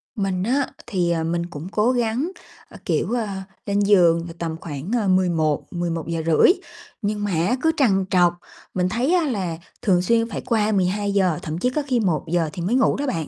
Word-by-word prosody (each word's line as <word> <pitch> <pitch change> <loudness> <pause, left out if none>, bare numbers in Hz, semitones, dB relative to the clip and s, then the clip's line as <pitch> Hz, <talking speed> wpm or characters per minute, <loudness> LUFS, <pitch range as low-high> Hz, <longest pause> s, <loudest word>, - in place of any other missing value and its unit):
Mình 195 -3 -1
á, 260 +5 +1 0.2
thì, 180 -5 0
ờ, 165 -1 0
mình 170 +1 -1
cũng 170 0 -8
cố 220 +4 +2
gắng, 245 +7 0 0.4
ơ, - - -12
kiểu, - - 0
ờ, 230 -3 0 0.4
lên 200 0 0
giường 175 -5 +4
là 165 - -8
tầm 165 -1 -3
khoảng, 150 +5 -6
ờ, 205 - -1
11:00-11:30, 165 - +2 0.5
nhưng 205 -1 -2
mà 205 - -1
á, 175 +9 +1
cứ 320 - +3
trằn 195 -9 +3
trọc, 175 -2 +4 0.4
mình 180 0 0
thấy 245 - +1
á 350 -2 +3
là 185 -9 -2 0.2
thường 185 -6 +3
xuyên 230 +4 +2
phải - - -4
qua 220 -2 +1
12:00, 195 -3 +1
thậm 155 +1 -4
chí 250 +8 +1
có 300 +4 -1
khi 250 -3 +2
1:00 165 -3 0
thì 175 - -5
mới 195 +8 0
ngủ 260 - +3
đó 285 - -2
bạn. 165 - -2
190 Hz, 195 wpm, -22 LUFS, 170-225 Hz, 0.5 s, giường